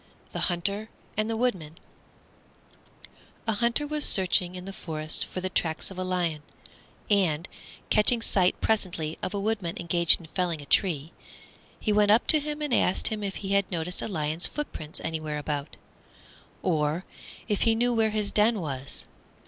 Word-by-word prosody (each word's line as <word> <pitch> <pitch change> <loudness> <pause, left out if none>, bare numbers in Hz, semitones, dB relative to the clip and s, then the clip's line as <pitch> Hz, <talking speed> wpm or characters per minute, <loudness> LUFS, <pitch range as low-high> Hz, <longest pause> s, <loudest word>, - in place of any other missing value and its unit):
THE - - -4
HUNTER 200 +5 -1 0.3
AND 215 +1 0
THE 225 - -1
WOODMAN 185 -10 -1 1.7
A 225 - +1
Hunter 235 +6 +1
was 300 0 -1
searching 185 -1 +4
in 180 0 -7
the 195 - -6
forest 155 -4 -3
for 185 - -6
the 185 - -2
tracks 160 +2 -1
of 185 - -8
a - - -1
lion, 175 -4 -1 0.7
and, 175 -4 +2 0.4
catching 220 +3 +4
sight 185 -5 +2
presently 170 -7 -1
of 185 - -3
a - - -1
Woodman 200 -5 -2
engaged 170 0 +4
in 170 - -12
felling 175 -4 0
a 145 - -9
tree, 160 -2 +1 0.7
he 215 - 0
went 210 0 +4
up 220 +4 +5
to 310 - +8
him 300 +1 -4
and 290 -4 -1
asked 185 - +3
him 215 -1 -4
if 195 -1 -3
he - - -3
had 200 -1 +2
noticed 175 +1 -2
a - - -3
lion's 160 -4 0
footprints 160 - -6
anywhere 155 -2 -3
about, 145 -1 -4 0.9
or 160 0 0 0.4
if 210 -3 0
he 225 -1 +4
knew 245 +2 +2
where 225 -1 +3
his 210 -1 -1
den 215 +1 +3
was. 140 -4 -4
185 Hz, 170 wpm, -27 LUFS, 160-215 Hz, 1.7 s, to